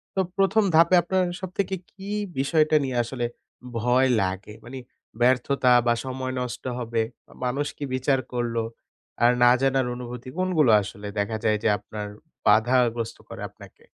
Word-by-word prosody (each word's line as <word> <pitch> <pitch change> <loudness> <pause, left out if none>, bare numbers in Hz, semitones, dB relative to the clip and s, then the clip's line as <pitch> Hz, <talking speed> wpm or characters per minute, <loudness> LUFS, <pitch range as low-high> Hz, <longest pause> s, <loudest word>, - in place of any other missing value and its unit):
তো - - 0 0.2
১ম 195 +3 +3
ধাপে 170 +3 +6
আপনার 185 +1 +1 0.2
সবথেকে 190 +1 -2 0.2
কি 195 0 -11 0.3
বিষয়টা 155 +2 +3
নিয়ে 130 -2 -2
আসলে 120 +1 -3 0.5
ভয় 125 +3 +3
লাগে? 95 +3 -3
মানে 130 +2 -8 0.4
ব্যর্থতা 130 +1 +3 0.2
বা 120 - +5
সময় 130 0 -4
নষ্ট 125 -3 -5 0.2
হবে 115 -1 -1 0.3
বা - - -17
মানুষ 140 +4 -1
কি 145 - -6
বিচার 130 +1 +1
করলো 120 -1 -1 0.6
আর 120 - +7
না 120 - +8
জানার 135 -1 +2
অনুভূতি 125 0 -7
কোনগুলো 165 -10 +3
আসলে 105 +1 -8
দেখা 105 +2 -1
যায় 110 -1 +3
যে - - +3
আপনার 105 +1 -7 0.4
বাধাগ্রস্ত 115 +1 +3
করে - - -8
আপনাকে? - - -16
125 Hz, 150 wpm, -25 LUFS, 115-145 Hz, 0.6 s, না